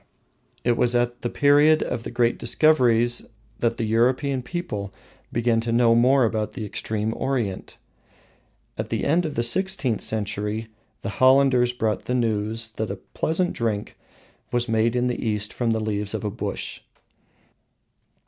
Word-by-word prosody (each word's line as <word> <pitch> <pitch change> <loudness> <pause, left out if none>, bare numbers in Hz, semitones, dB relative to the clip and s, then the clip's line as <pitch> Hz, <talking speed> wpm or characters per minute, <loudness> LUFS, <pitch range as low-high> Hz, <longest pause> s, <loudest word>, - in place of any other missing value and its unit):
It 120 -1 +2
was 120 0 +2
at 120 0 0
the 120 - -2
period 145 +3 +4
of 120 - -3
the - - -6
great 120 0 +1
discoveries 120 -6 +3 0.3
that 115 -1 0
the 115 - -1
European 125 +4 +1
people 125 - -5 0.4
began 115 -1 +1
to 115 0 -3
know 115 0 +4
more 125 +2 +4
about 110 -1 -2
the 110 -5 -5
extreme 110 +1 -2
Orient. 120 -8 -3 1.0
At - - -3
the - - -2
end 165 +3 +2
of 150 - -6
the 120 - 0
sixteenth 140 - 0
century 105 +1 -3 0.3
the - - -3
Hollanders 130 -2 +5
brought 110 -3 -2
the 125 - -1
news 115 -1 0
that 110 0 -2
a - - -3
pleasant 175 +3 -2
drink 110 -3 -2 0.6
was 120 0 0
made 115 +1 +1
in 125 0 +1
the 125 -1 -2
East 105 -2 -1
from 120 -2 -1
the 110 0 +1
leaves 105 -1 -2
of 110 - -4
a 105 - -2
bush. 110 - -5
120 Hz, 160 wpm, -24 LUFS, 110-125 Hz, 1.0 s, Hollanders